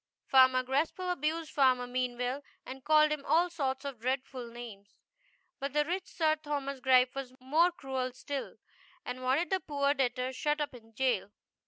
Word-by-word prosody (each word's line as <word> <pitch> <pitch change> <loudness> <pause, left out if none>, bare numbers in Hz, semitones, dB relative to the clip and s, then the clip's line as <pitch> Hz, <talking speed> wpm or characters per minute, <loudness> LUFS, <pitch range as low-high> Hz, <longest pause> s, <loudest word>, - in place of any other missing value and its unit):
Farmer 260 -1 +5
Graspall 310 +8 -1
abused 320 0 -2
Farmer 255 -3 +3
Meanwell 250 +2 -2 0.2
and 265 0 -8
called 305 +1 +5
him 300 -2 -2
all 345 +4 +3
sorts 270 -5 -2
of 275 -5 -5
dreadful 255 0 -3
names; 225 -4 -10 0.6
but 275 0 -3
the 295 0 +2
rich 365 +3 -3
Sir 315 -2 +1
Thomas 285 -3 -4
Gripe 255 -1 +4
was 265 -2 -6
more 310 +8 +3
cruel 265 -6 -3
still, 275 +2 -5 0.5
and 250 +1 -5
wanted 270 +8 +1
the 380 - +2
poor 285 -4 0
debtor 255 -1 -1
shut 295 +4 0
up 295 -2 -2
in 225 -2 -15
jail. 245 -6 +1
270 Hz, 165 wpm, -31 LUFS, 255-300 Hz, 0.6 s, Farmer